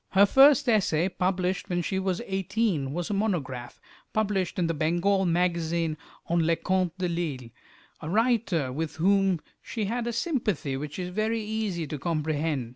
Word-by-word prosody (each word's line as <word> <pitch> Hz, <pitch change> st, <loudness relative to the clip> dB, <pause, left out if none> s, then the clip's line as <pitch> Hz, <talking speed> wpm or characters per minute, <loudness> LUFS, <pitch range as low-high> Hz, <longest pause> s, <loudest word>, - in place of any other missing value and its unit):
Her 195 Hz, +1 st, +7 dB
first 275 Hz, +5 st, +6 dB
essay, 190 Hz, -6 st, +2 dB
published 185 Hz, +1 st, -1 dB
when 175 Hz, -1 st, 0 dB
she 190 Hz, +3 st, -1 dB
was 190 Hz, +3 st, -1 dB
eighteen, 190 Hz, -, -1 dB
was 175 Hz, +5 st, -3 dB
a -, -, 0 dB
monograph, 155 Hz, -, -2 dB, 0.4 s
in 195 Hz, -4 st, 0 dB
the 165 Hz, -, 0 dB
"Bengal 175 Hz, +5 st, +1 dB
Magazine," 170 Hz, -2 st, 0 dB, 0.3 s
on 170 Hz, +1 st, +1 dB
Leconte 175 Hz, +2 st, 0 dB
de 185 Hz, -1 st, -1 dB
Lisle, 155 Hz, -8 st, -3 dB, 0.5 s
a 155 Hz, -, -5 dB
writer 215 Hz, -, +1 dB
with 155 Hz, +1 st, -3 dB
whom 195 Hz, +1 st, +3 dB, 0.2 s
she 220 Hz, -3 st, -3 dB
had 235 Hz, +3 st, -2 dB
a -, -, 0 dB
sympathy 220 Hz, -, -1 dB
which 145 Hz, +2 st, -5 dB
is 180 Hz, -1 st, -3 dB
very 215 Hz, +4 st, -1 dB
easy 210 Hz, -6 st, -2 dB
to 150 Hz, 0 st, -5 dB
comprehend. 155 Hz, -4 st, -1 dB
180 Hz, 155 wpm, -27 LUFS, 160-205 Hz, 0.5 s, Her